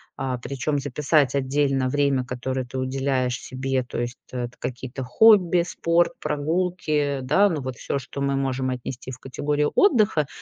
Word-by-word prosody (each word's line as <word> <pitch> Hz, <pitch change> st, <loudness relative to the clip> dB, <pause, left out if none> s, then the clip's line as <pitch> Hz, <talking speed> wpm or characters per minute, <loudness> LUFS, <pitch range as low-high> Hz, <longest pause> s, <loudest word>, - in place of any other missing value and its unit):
А, 130 Hz, -2 st, -2 dB
причём 140 Hz, +4 st, -2 dB
записать 140 Hz, 0 st, +1 dB
отдельно 135 Hz, -1 st, +1 dB
время, 140 Hz, -2 st, +1 dB
которое 125 Hz, +1 st, -3 dB
ты 130 Hz, +2 st, -7 dB
уделяешь 130 Hz, -1 st, -1 dB
себе. 130 Hz, 0 st, -2 dB
То 125 Hz, -, -6 dB
есть 120 Hz, +1 st, -4 dB
это 120 Hz, -1 st, -4 dB
какие-то 130 Hz, +1 st, -5 dB
хобби, 180 Hz, -, +5 dB
спорт, 170 Hz, 0 st, +1 dB
прогулки, 150 Hz, -2 st, -1 dB
да, 200 Hz, +10 st, +4 dB
ну, 155 Hz, -5 st, -2 dB
вот 130 Hz, -2 st, -5 dB
всё, -, -, -2 dB
что 140 Hz, +1 st, -7 dB
мы 140 Hz, 0 st, +1 dB
можем 130 Hz, -1 st, -1 dB
отнести 125 Hz, 0 st, -5 dB
в 125 Hz, -, -8 dB
категорию 145 Hz, +2 st, -1 dB
отдыха. 215 Hz, -, +3 dB
135 Hz, 155 wpm, -24 LUFS, 130-150 Hz, -, хобби